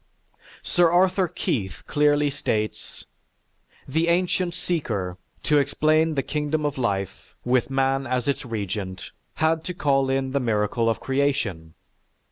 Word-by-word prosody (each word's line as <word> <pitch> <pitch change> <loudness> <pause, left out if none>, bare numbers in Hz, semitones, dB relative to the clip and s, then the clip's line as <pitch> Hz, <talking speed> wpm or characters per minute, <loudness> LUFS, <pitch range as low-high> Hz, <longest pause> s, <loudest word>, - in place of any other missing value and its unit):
Sir 175 -1 +3
Arthur 185 +2 +3
Keith 100 - -3
clearly 145 -1 +2
states: 110 -6 -3 0.8
"The 160 +5 +1
ancient 175 0 +1
seeker, 110 - -2 0.2
to 150 -1 +4
explain 155 +3 +2
the 135 - 0
kingdom 150 0 -1
of 145 -2 -2
life, 100 -6 -3
with 125 +1 +2
man 135 0 +1
as 125 0 -1
its 140 +1 0
Regent, 100 -5 -4 0.2
had 160 0 +1
to 180 - -4
call 135 -6 +2
in 135 0 0
the 140 - +1
miracle 115 -1 +1
of 115 - 0
creation. 130 - -1
135 Hz, 130 wpm, -24 LUFS, 115-155 Hz, 0.8 s, to